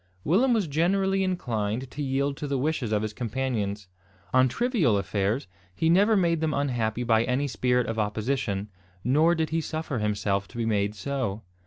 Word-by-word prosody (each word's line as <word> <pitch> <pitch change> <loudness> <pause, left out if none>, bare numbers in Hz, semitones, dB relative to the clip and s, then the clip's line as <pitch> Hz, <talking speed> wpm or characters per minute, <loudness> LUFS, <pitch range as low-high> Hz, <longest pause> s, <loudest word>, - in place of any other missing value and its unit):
Willem 225 - +3
was 220 -5 +2
generally 190 +5 +1
inclined 120 - -2
to 150 - -6
yield 140 0 0
to 145 - -4
the 140 -1 0
wishes 135 -4 -1
of 105 0 +1
his 110 -1 -3
companions. 110 -5 -2 0.5
On 130 0 +5
trivial 185 - +1
affairs, 100 +5 -1 0.3
he 160 0 +2
never 205 +5 +5
made 170 -3 +2
them 155 -2 0
unhappy 120 -4 -1
by 115 -1 +3
any 130 +4 0
spirit 125 -2 +1
of 115 0 -3
opposition, 105 -1 -1 0.3
nor 155 +8 +4
did 160 -2 -1
he 165 0 +1
suffer 155 -5 -3
himself 100 -2 0
to 120 - -12
be 115 - -1
made 105 -1 0
so. 110 -1 -3
130 Hz, 175 wpm, -26 LUFS, 110-160 Hz, 0.5 s, On